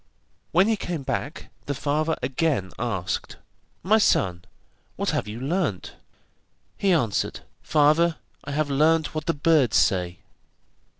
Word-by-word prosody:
When 185 +5 +4
he 225 -1 +1
came 170 -7 -4
back 145 +3 -4 0.2
the 145 - -2
father 155 +3 0
again 130 - 0
asked: 110 -7 -3 0.5
'My 215 +4 +4
son, 90 - +2 0.5
what - - -1
have - - -2
you 105 +2 -6
learnt?' 140 - -2 0.8
He 195 - +1
answered: 115 - 0 0.2
'Father, 155 +3 +3 0.3
I - - -8
have 145 0 -1
learnt 155 +3 +2
what 155 -1 -4
the 165 - +1
birds 145 -6 +3
say. 90 -3 +1
150 Hz, 130 wpm, -24 LUFS, 120-165 Hz, 0.8 s, When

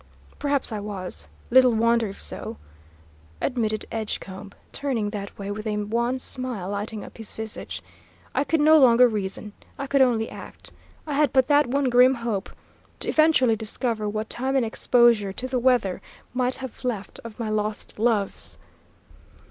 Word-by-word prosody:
"Perhaps 285 -3 0
I 215 - -3
was; 200 -3 -6 0.2
little 255 -1 +7
wonder 230 0 +3
if 195 - -8
so," - - -5 0.8
admitted 220 -5 -1
Edgecombe, 200 -3 -4 0.2
turning 235 -7 -2
that 200 -2 -6
way, 200 0 -5
with 215 +2 -5
a 210 -1 -1
wan 235 +5 0
smile 255 -7 -5
lighting 205 +1 -4
up - - -13
his 225 - -5
visage. 220 -1 -6 0.5
"I - - +2
could 320 +1 +1
no 310 +1 +7
longer 250 -2 +7
reason. 210 -1 -3 0.2
I 275 - -3
could 275 0 +2
only 230 -4 +3
act. - - -11 0.3
I 300 - -4
had 290 -2 +3
but 260 -1 +4
that 290 -2 +5
one 275 +3 +1
grim 250 +2 +6
hope, 230 -5 -3 0.5
to - - -1
eventually 310 -7 +4
discover 220 0 -2
what 215 +1 -3
time 265 +4 -2
and 260 -3 +3
exposure 230 -3 +3
to 255 - -4
the 255 -1 0
weather 240 -7 +2 0.3
might 250 0 +1
have 260 -2 -8
left 225 -6 -3
of 230 -1 -10
my 225 -2 -2
lost 215 0 -3
loves. 215 -4 0
230 Hz, 165 wpm, -25 LUFS, 210-255 Hz, 0.8 s, little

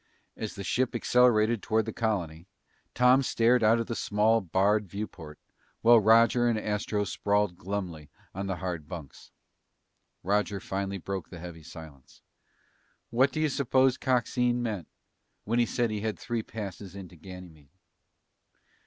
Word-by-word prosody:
As 110 - -5
the 100 - -6
ship 125 +5 0
accelerated 120 -2 +3
toward 110 0 +1
the 110 - -5
colony, 90 -7 -2 0.5
Tom 125 +2 +5
stared 120 -1 +2
out 110 +2 +5
of 115 - -1
the 115 - -4
small, 110 +2 +2
barred 100 +3 +1
viewport 85 -6 -7 0.4
while 115 0 +7
Roger 115 +3 +5
and 115 -2 +1
Astro 105 -1 -1
sprawled 100 0 0
glumly 90 -5 -5 0.2
on 100 +1 -4
the 95 - -2
hard 85 -4 -5
bunks. 80 -7 -10 0.9
Roger 100 +1 0
finally 100 +1 -3
broke 95 -1 -5
the 90 - -9
heavy 85 -1 -9
silence. 80 -4 -13 0.9
"What 130 +4 +3
do 155 - -4
you 155 -1 +2
suppose 130 -1 +2
Coxine 125 -1 +1
meant 105 -8 -3 0.6
when 115 +3 0
he 120 - +3
said 120 -1 0
he 105 -1 -3
had 110 0 -2
three 120 -1 -3
passes 100 -3 -8
into 95 -3 -10
Ganymede?" 85 -4 -12
105 Hz, 145 wpm, -28 LUFS, 90-115 Hz, 0.9 s, while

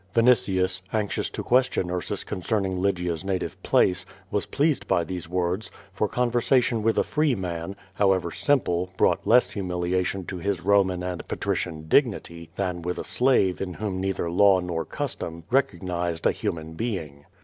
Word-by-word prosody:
Vinitius, 95 -6 +3
anxious 105 -2 -1
to - - -5
question 125 -8 +2
Ursus 90 -1 -3
concerning 95 -1 -2
Lygia's 90 -3 0
native 95 -1 -3
place, 90 0 +2 0.3
was 105 - -1
i)lcased 145 -1 +1
by 85 - +2
these 85 -1 -6
words, 90 +3 -1 0.2
for 105 +2 0
conversation 120 0 +2
with 110 +1 +1
a - - +4
free 150 -4 +1
man, 90 0 -4 0.2
however 95 -4 +2
simple, 90 -11 +1
brought - - +2
less 120 +2 +5
humiliation 90 0 -1
to 95 - -5
his 100 0 -1
Koman 95 -1 +2
and 90 -1 -5
patrician 80 -3 -2
dignity 85 - +1
than 90 -3 -2
with 90 +1 -3
a - - -3
slave 125 -8 +2
in 90 -2 -4
whom 100 -4 -3
neither 95 -2 -1
law 95 +1 +5
nor 85 -3 -3
custom 85 +2 -5
recognized 90 -10 0
a - - +5
human 80 -1 -4
being. 80 -9 -4
95 Hz, 155 wpm, -25 LUFS, 90-105 Hz, 0.3 s, less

